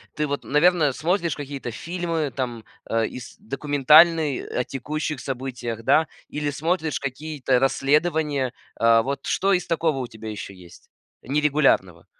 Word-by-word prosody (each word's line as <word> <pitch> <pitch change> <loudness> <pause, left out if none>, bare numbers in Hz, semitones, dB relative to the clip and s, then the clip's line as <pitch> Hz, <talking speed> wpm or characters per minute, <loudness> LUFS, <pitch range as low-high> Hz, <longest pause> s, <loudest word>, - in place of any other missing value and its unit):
Ты 150 - 0
вот, 145 -1 -4
наверное, 150 -1 +3
смотришь 170 +3 0
какие-то 140 -4 -6
фильмы, 165 0 -3
там, 120 -4 -3 0.2
а, 115 0 0
ис 125 +1 -8
документальные, 150 +3 +4
о 125 - -1
текущих 150 +3 -4
событиях, 125 -4 -5
да? 155 +6 +4 0.2
Или 150 0 -2
смотришь 160 +2 -1
какие-то 140 -1 -1
расследования. 145 0 +1 0.3
Э, 115 0 +5
вот 135 +1 -4
что 195 - +1
из 180 -2 0
такого 160 -3 0
у 130 -2 -3
тебя 110 -1 -9
еще 105 -2 -7
есть? 90 -2 -16 0.3
Нерегулярного. 140 - +1
145 Hz, 140 wpm, -23 LUFS, 125-155 Hz, 0.3 s, Э